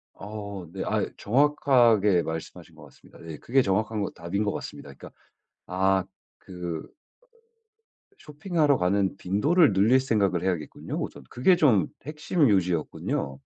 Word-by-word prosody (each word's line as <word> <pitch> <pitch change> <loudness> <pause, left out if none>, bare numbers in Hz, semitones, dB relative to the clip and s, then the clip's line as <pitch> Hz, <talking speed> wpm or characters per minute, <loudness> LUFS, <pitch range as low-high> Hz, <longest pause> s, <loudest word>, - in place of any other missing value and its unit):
어. 100 -2 -7
네 95 - -5
아 - - 0
정확하게 120 -6 +3
말씀하신 80 0 -7
것 - - -15
같습니다. - - -19
네 80 -2 -9
그게 135 +3 +1
정확한 110 0 -1
거 100 - -3
답인 85 +5 -3
것 100 - 0
같습니다. - - -8
그러니까 - - -13 0.6
아 95 +1 +1 0.4
그 90 -3 -6
으 - - -21 1.3
쇼핑하러 150 -2 0
가는 95 +1 0
빈도를 140 - +2
늘릴 110 +7 +4
생각을 100 -9 0
해야겠군요, 90 -5 -3
우선. - - -6
그게 155 +10 +3
좀 115 - +3 0.2
핵심 150 +1 0
요지였군요. 85 -7 -1
100 Hz, 305 characters per minute, -26 LUFS, 90-130 Hz, 1.3 s, 늘릴